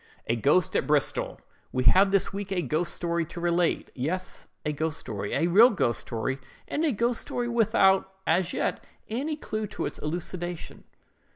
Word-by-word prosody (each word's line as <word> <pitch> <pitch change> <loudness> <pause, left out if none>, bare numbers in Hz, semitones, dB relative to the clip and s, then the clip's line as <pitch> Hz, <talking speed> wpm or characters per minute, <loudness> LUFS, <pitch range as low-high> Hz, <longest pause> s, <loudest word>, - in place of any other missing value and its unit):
"A 115 - +1
GHOST 145 - +2
AT - - +1
BRISTOL.—We 145 -3 -1
have 190 - +6
this 195 0 +1
week 200 0 -5
a 180 -2 0
ghost 155 +5 -1
story 170 -1 -1
to 170 - -8
relate. 175 0 +1
Yes, 170 +9 -4 0.2
a 150 - 0
ghost 160 +2 -1
story; 100 -2 -5
a - - +2
real 205 +8 +7
ghost 120 - 0
story, 120 +4 -3 0.3
and 310 - -1
a 315 - +3
ghost 235 +1 0
story 245 -1 -3
without, 205 -5 +3
as 175 +2 +2
yet, - - -1 0.3
any 275 +8 -2
clew 215 -7 -4
to - - -4
its - - -4
elucidation. 175 +2 -5
175 Hz, 170 wpm, -27 LUFS, 150-200 Hz, 0.3 s, real